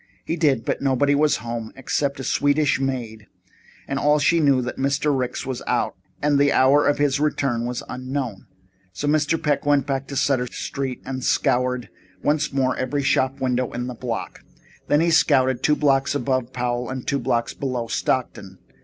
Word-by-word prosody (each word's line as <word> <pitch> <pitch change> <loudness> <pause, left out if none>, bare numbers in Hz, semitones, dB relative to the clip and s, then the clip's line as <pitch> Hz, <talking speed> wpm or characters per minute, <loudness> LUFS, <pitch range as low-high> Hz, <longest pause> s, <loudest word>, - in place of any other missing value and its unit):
He 165 - -1
did, 145 -8 +1
but - - -1
nobody 140 +1 +2
was 150 +1 +3
at - - -12
home 115 -1 -5
except 140 +1 -2
a - - -4
Swedish 145 +1 +2
maid, 120 -5 -4 0.6
and 135 - -2
all 150 +1 +3
she 165 +3 +3
knew 140 -3 +4
was 125 -1 -1
that 125 - -5
Mr. 140 +2 +1
Ricks 125 0 -2
was 130 -2 -4
out - - 0 0.3
and 145 -1 +3
the 140 0 +4
hour 140 +3 +4
of 145 - +2
his 145 -1 +1
return 135 -5 0
was 125 0 -4
unknown. 130 -5 -5 0.5
So 145 - -3
Mr. 155 +2 +2
Peck 150 -2 0
went 145 -2 +2
back 135 -2 -2
to 140 - -6
Sutter 130 -2 +1
Street 130 +1 -5
and 130 -1 -5
scoured 125 -1 +1 0.3
once 150 0 +1
more 130 -2 +1
every 140 +2 -2
shop 135 0 +1
window 125 -1 0
in 125 0 -3
the 125 - -5
block. 120 -1 -5 0.5
Then 145 +1 +3
he 170 0 +2
scouted 130 -4 +3
two 150 +2 +3
blocks 140 -1 +2
above 130 -3 -1
Powell 120 -1 -2
and 130 -1 -5
two 140 - 0
blocks 120 -2 -1
below 130 -4 -3
Stockton. 100 -7 -2
135 Hz, 190 wpm, -23 LUFS, 125-145 Hz, 0.6 s, knew